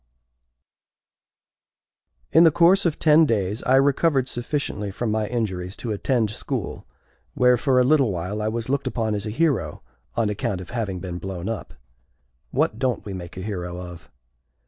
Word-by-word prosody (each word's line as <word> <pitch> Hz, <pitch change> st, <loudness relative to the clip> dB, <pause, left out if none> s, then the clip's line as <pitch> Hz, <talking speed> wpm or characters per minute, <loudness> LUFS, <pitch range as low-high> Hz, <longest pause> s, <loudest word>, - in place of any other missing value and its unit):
C. -, -, +7 dB
In -, -, +8 dB
the 165 Hz, -, +8 dB
course 175 Hz, +4 st, +4 dB
of 155 Hz, -, -2 dB
ten 155 Hz, 0 st, +5 dB
days 105 Hz, -1 st, 0 dB
I 130 Hz, -, +3 dB
recovered 135 Hz, 0 st, +3 dB
sufficiently 120 Hz, -5 st, -3 dB
from 110 Hz, +3 st, -3 dB
my 110 Hz, 0 st, 0 dB
injuries 95 Hz, -6 st, -3 dB
to 115 Hz, -, -4 dB
attend 110 Hz, +1 st, 0 dB
school, -, -, -4 dB, 0.5 s
where, 125 Hz, 0 st, +5 dB
for 130 Hz, +1 st, +2 dB
a -, -, +5 dB
little 135 Hz, -4 st, +3 dB
while, 95 Hz, +4 st, -3 dB
I 105 Hz, -, -1 dB
was 115 Hz, +1 st, -3 dB
looked 140 Hz, 0 st, -1 dB
upon 115 Hz, -4 st, -1 dB
as 105 Hz, 0 st, -3 dB
a -, -, -2 dB
hero, 120 Hz, -, 0 dB, 0.3 s
on 115 Hz, -, +1 dB
account 100 Hz, -2 st, -2 dB
of 90 Hz, -, -9 dB
having 100 Hz, -7 st, -3 dB
been 90 Hz, -1 st, -5 dB
blown 95 Hz, -1 st, -5 dB
up. 115 Hz, -, -5 dB, 0.7 s
What 110 Hz, -, 0 dB
don't 130 Hz, -3 st, -1 dB
we 100 Hz, -, -5 dB
make 90 Hz, -2 st, -8 dB
a -, -, -4 dB
hero 90 Hz, -3 st, -4 dB
of? 90 Hz, -2 st, -10 dB
110 Hz, 170 wpm, -23 LUFS, 95-130 Hz, 0.7 s, In